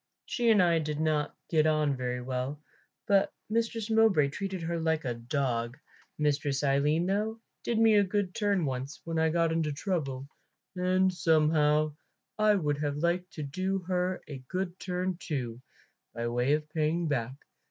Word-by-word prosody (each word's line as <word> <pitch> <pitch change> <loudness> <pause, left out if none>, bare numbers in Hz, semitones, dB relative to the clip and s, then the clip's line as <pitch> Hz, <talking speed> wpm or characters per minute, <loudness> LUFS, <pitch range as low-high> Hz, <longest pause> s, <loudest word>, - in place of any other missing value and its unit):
She 240 -2 +1
and 210 -4 +6
I 170 -2 +3
did 150 -1 -3
not 155 -2 0
get 155 -2 +3
on 155 -2 +2
very 125 -1 -3
well; 130 +3 -3 0.5
but 200 -3 +3 0.2
Mistress 225 -1 -1
Mowbray 220 -10 +4
treated 190 +3 -4
her 170 0 -2
like 160 -2 0
a 120 - 0
dog. 120 0 -2 0.4
Mistress 145 -2 0
Aline, 145 +4 +2
though, 210 +4 -1 0.2
did 235 - 0
me 225 -1 +5
a 205 -1 +6
good 195 -1 -1
turn 200 -5 +1
once, 135 +1 -4
when 165 -1 -2
I 160 0 +3
got 165 0 +2
into 160 -2 0
trouble, 140 -5 -3 0.5
and 185 +1 +2
somehow 155 -2 +3 0.5
I 215 -1 +5
would 150 -6 0
have 145 -1 -1
liked 175 +4 -1
to 155 - -5
do 185 +7 -1
her 180 0 -1
a 140 -3 -7
good 185 +1 -3
turn 180 0 -2
too, 125 -8 -4 0.5
by 115 0 -2
way 125 +4 +1
of 150 0 -1
paying 160 +2 0
back. 130 -3 -1
160 Hz, 165 wpm, -29 LUFS, 145-185 Hz, 0.5 s, and